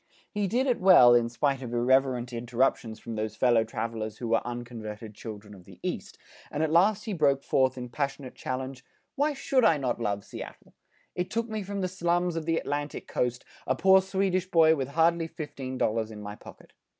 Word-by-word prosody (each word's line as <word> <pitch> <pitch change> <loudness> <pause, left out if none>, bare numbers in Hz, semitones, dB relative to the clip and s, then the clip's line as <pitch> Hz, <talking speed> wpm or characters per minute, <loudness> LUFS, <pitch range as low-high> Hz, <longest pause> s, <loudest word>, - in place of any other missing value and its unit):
He 205 -2 -1
did 245 +7 +1
it 250 -3 +1
well 180 -10 +8
in 120 -1 +3
spite 135 +2 0
of 120 -2 -5
irreverent 125 0 +2
interruptions 120 -1 -1
from 115 - -7
those 110 -1 -3
fellow 120 -2 +3
travelers 110 -1 -4
who 120 - -5
were 115 - +3
unconverted 115 -3 -7
children 105 -1 -9
of 90 -3 -14
the - - -15
East, - - -4 0.3
and 150 +1 -2
at 155 - 0
last 195 +5 +3
he 215 - -3
broke 140 -5 +2
forth 130 -1 +2
in 125 -1 -5
passionate 140 0 -4
challenge, 130 0 -5 0.3
"Why 290 +2 +1
should 270 -2 +1
I 190 -9 +5
not 125 -4 -2
love 100 -2 -1
Seattle! - - -10 0.4
It 180 0 -3
took 230 +1 -1
me 220 -2 -3
from 200 0 -4
the 185 - 0
slums 175 -1 0
of 165 -1 -4
the 165 0 +2
Atlantic 145 -1 -3
Coast, 125 0 -2 0.2
a 130 - +2
poor 190 +5 +6
Swedish 190 -1 -1
boy 160 -2 +5
with 135 -4 -2
hardly 165 +3 +2
fifteen 135 -5 -6
dollars 110 -1 0
in 110 -1 -9
my 105 0 -6
pocket. - - -15
135 Hz, 200 wpm, -28 LUFS, 115-175 Hz, 0.4 s, well